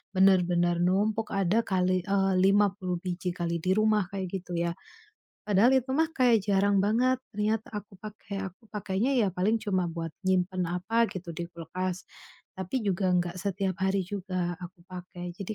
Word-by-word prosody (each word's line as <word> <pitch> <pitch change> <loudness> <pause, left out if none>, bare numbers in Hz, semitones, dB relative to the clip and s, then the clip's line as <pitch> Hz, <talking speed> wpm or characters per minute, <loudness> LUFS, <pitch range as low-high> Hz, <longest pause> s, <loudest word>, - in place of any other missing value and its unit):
benar-benar 175 -2 +4
numpuk. 205 +5 +1
Ada 195 +3 +2
kali, 185 -1 +1
eee, 195 -1 +2
50 195 -2 +2
biji 180 0 -3
kali 170 -2 -2
di 185 - -2
rumah, 215 -4 +2
kayak 190 -2 -3
gitu 175 -1 -5
ya. 170 0 0 0.7
Padahal 210 +5 +4
itu 260 +1 -5
mah 320 +2 +2
kayak 245 -8 +3
jarang 200 0 +3
banget 250 +5 +2 0.2
niat 215 +1 +1
aku 205 -1 -7
pakai. 205 -2 -6
Aku 205 +6 -26
pakainya 210 +5 -1
ya 220 -6 +3
paling 200 +6 +1
cuma 185 -4 0
buat 165 -1 -4 0.2
nyimpan 185 0 +1 0.2
apa 225 +5 +2
gitu 180 -2 -7
di 170 +1 -4
kulkas, 180 +2 -4 0.6
tapi 190 +7 -2
juga 190 -2 +1
enggak 175 0 0
setiap 195 -1 -2
hari 190 0 +2
juga 185 -3 -3
aku 180 -1 -10
pakai. 180 -1 -7
Jadi 200 +3 -5
190 Hz, 160 wpm, -28 LUFS, 180-210 Hz, 0.7 s, benar-benar